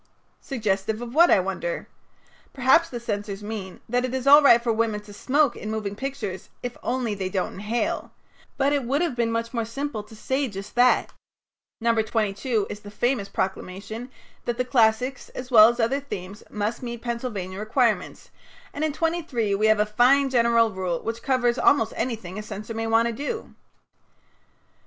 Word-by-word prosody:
Suggestive 215 -4 -1
of 240 0 -7
what, 340 +4 +6
I - - +6
wonder? - - -3 0.7
Perhaps 270 +6 +4
the 240 - -5
censors 205 -3 -4
mean 205 -3 -6
that 245 +2 0
it 255 0 -2
is 260 0 -3
all 290 +2 +9
right 255 -5 +7
for 235 -1 0
women 220 -1 0
to 205 0 -13
smoke 275 +5 +2
in 215 - -6
moving 215 -2 -3
pictures 265 -7 -5
if 245 0 -4
only 245 -3 -1
they 195 -2 -3
don't 185 -1 -2
inhale, 215 +4 -2 0.5
but 280 +1 +2
it 285 -2 +1
would 275 +7 +1
have 325 -8 -1
been 235 -1 0
much 230 +1 -2
more 230 -2 0
simple 230 +1 -4
to 210 +2 -15
have - - -15
said 265 -1 -1
just 195 +2 -7
that. 245 +1 +3 0.7
No. 230 0 +2
22 220 0 0
is 205 - -7
the 205 - -11
famous 210 0 -1
proclamation 200 +5 -4 0.4
that 240 -1 -2
the 250 - 0
classics, 250 +1 +2
as 255 0 -7
well 220 -2 +9
as 240 +1 -3
other 240 +5 +1
themes, 200 -8 -7
must 210 +2 -3
meet 235 -2 -6
Pennsylvania 225 -6 -4
requirements, 220 +1 0 0.4
and 290 - -3
in 310 -2 0
23 310 -10 -1
we 210 +2 +2
have 215 -1 +4
a 210 - +4
fine 255 +6 +3
general 235 -2 +4
rule 185 -3 -2
which 230 0 -4
covers 250 -2 +1
almost 225 -6 +3
anything 220 -5 -3
a - - -4
censor 215 +1 -7
may 225 0 -3
want 225 +1 +3
to 235 - -2
do. 295 - -5
230 Hz, 185 wpm, -25 LUFS, 210-255 Hz, 0.7 s, all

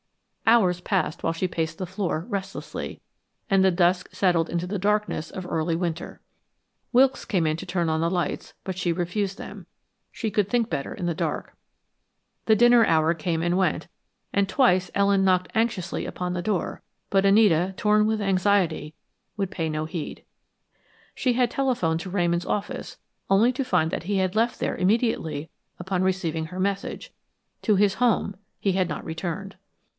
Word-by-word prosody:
Hours 190 -6 +4
passed 180 -5 -1
while 165 - +1
she 165 +3 -1
paced 160 -2 -3
the 185 - -3
floor, 180 -3 -2
restlessly, 195 -3 -5 0.5
and 195 -2 +4
the 190 - +6
dusk 175 0 +2
settled 175 -4 +2
into 170 +1 -2
the 200 +1 -3
darkness 210 -4 0
of 185 - -7
early 165 -1 -1
winter. 170 -1 -4 0.7
Wilkes 260 +1 +4
came 180 -6 0
to 165 - -7
turn 175 -2 -1
on 160 0 0
the 165 - +2
lights, 175 -1 -2
but 190 -1 -4
she 180 -2 0
refused 185 +3 -2
them - - -9 0.4
she 225 - -3
could 205 -1 0
think 235 -2 +1
better 140 - -3
in 180 - -5
the 170 - 0
dark. - - -3 0.9
The 220 - +6
dinner 240 +1 +6
hour 160 -1 +3
came 165 0 -2
and 175 +1 +1
went 190 -1 0 0.5
and 200 -1 +2
twice 185 -6 +3
Ellen 200 -1 +3
knocked 185 -1 +2
anxiously 220 -5 -1
upon 180 0 -3
the 180 - -2
door, 185 -2 -2 0.3
but 195 -1 +4
Anita, 195 -3 +4
torn 210 0 +3
with 220 0 +1
anxiety, 185 -5 +1 0.4
would 195 -2 -2
pay 165 -3 -2
no 155 0 -2
heed. 160 -1 -6 0.9
She 255 -2 +1
had 245 -1 +2
telephoned 235 -13 0
to 190 - -6
Ramon's 175 -2 0
office, 205 - -3 0.3
only 220 +6 +4
to 270 - -1
find 180 -10 +1
that - - -3
he 200 +3 -1
had 190 +1 0
left 230 +2 +1
there - - -1
immediately 185 - 0 0.3
upon 185 0 -1
receiving 170 -4 -1
her 180 +3 -7
message; 195 +1 -3 0.5
to 210 - +3
his 200 0 +3
home 230 -3 +1 0.2
he 195 - +1
had 185 -2 +1
not - - -5
returned. 175 +4 -5
185 Hz, 170 wpm, -25 LUFS, 170-205 Hz, 0.9 s, the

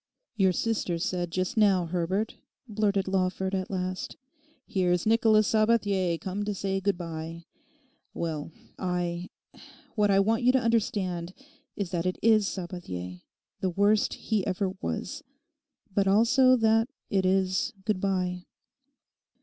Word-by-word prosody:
'Your 190 -3 +3
sister 190 -2 -1
said 175 0 -2
just 185 +5 -2
now, 195 -5 +4
Herbert,' 180 +5 -2 0.3
blurted 205 -3 0
Lawford 190 0 0
at 185 -1 -2
last. 185 -1 -4 0.5
'"Here's 180 -2 +1
Nicholas 220 -1 +4
Sabathier 205 -6 +2
come 195 +2 -3
to 205 0 -2
say 195 0 -2
good 195 -2 +1
bye" 165 -1 -6 0.7
well, 160 -2 -4 0.3
I—what 180 +3 -4
I 195 0 +4
want 225 +5 +2
you 250 +1 +5
to 260 - +4
understand 195 -7 -1 0.4
is 200 -4 -3
that 175 -1 -1
it 185 - -1
is 215 -2 +5
Sabathier, 90 - -6 0.4
the 190 - 0
worst 205 +4 +2
he 215 -3 -1
ever 190 0 -1
was; 275 +7 -4 0.7
but 195 0 +2
also 240 +6 +5
that 225 0 +3 0.2
it 195 -1 +2
is 190 +4 +1
"good 210 -4 0
bye." 180 -2 -1
190 Hz, 130 wpm, -28 LUFS, 180-215 Hz, 0.7 s, you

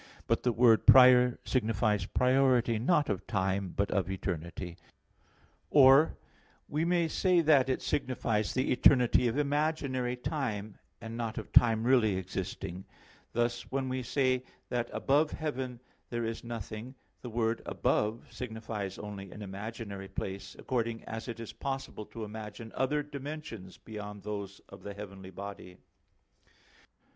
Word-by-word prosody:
But - - +1
the 125 - +2
word 115 -1 +4
"prior" 125 -1 +8
signifies 110 -5 +1
priority 125 -3 +3
not 150 +4 +2
of 100 -4 -3
time, 95 -2 -1
but 100 - +1
of 95 -3 0
eternity. 85 -2 -4 0.9
Or 140 +2 +6 0.5
we 150 +2 -1
may 170 -1 +2
say 180 +2 +3
that 145 -5 +4
it 130 - -1
signifies 125 -6 0
the 130 - 0
eternity 125 -1 +5
of 115 +3 -1
imaginary 145 -4 0
time, 115 -7 -3 0.2
and 115 +1 -6
not 115 -2 -3
of - - -6
time 115 -2 +5
really 120 -5 +4
existing; 95 0 -5 0.5
thus, 120 0 -1
when 135 0 -1
we 130 0 -2
say 130 0 +1 0.3
that 120 -1 -1
above 150 +3 +2
heaven 130 -5 -4 0.3
there 120 -1 -2
is 115 0 -4
nothing, 115 +1 -6 0.3
the 125 - -6
word 115 0 0
"above" 110 +2 0
signifies 110 -5 -5
only 100 -2 -7
an 105 - -8
imaginary 100 0 -6
place, 95 0 -6
according 115 -2 -2
as 115 +2 -6
it 115 -1 -5
is 115 - -7
possible 135 -6 -5
to 115 - -7
imagine 110 +1 -8
other 145 +3 0
dimensions 140 -9 -7
beyond 105 -2 -8
those 100 -2 -5
of - - -13
the 100 -1 -7
heavenly 95 -2 -9
body. 95 -1 -8
115 Hz, 140 wpm, -31 LUFS, 105-130 Hz, 0.9 s, prior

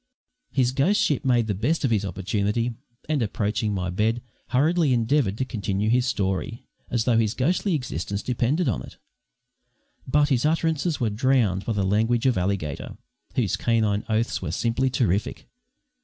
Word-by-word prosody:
His 130 -2 +1
ghostship 175 +2 +2
made 120 -3 +3
the 105 - -1
best 135 - 0
of 130 - +1
his 105 -3 +2
opportunity, 100 +5 -1 0.3
and, 150 -3 0
approaching 105 0 -1
my 90 -3 -2
bed, 110 +5 0 0.2
hurriedly 150 +2 +2
endeavoured 115 -3 +1
to 130 - -1
continue 105 -3 -1
his 125 +1 +2
story, 95 +2 -2 0.2
as 120 -2 0
though 115 -1 +3
his 110 0 0
ghostly 175 +7 +1
existence 100 - -3
depended 130 +7 0
on 120 - 0
it. - - -11 1.1
But 145 +2 +3
his 125 -4 +2
utterances 160 0 +1
were 115 -3 0
drowned 110 -4 +1
by 115 - -1
the 100 -2 0
language 115 +5 +1
of 130 -2 +3
Alligator, 90 -6 -2 0.4
whose - - +1
canine 110 -3 +1
oaths 110 +1 0
were 90 - -3
simply 120 +7 0
terrific. 105 -6 -1
115 Hz, 155 wpm, -24 LUFS, 105-130 Hz, 1.1 s, made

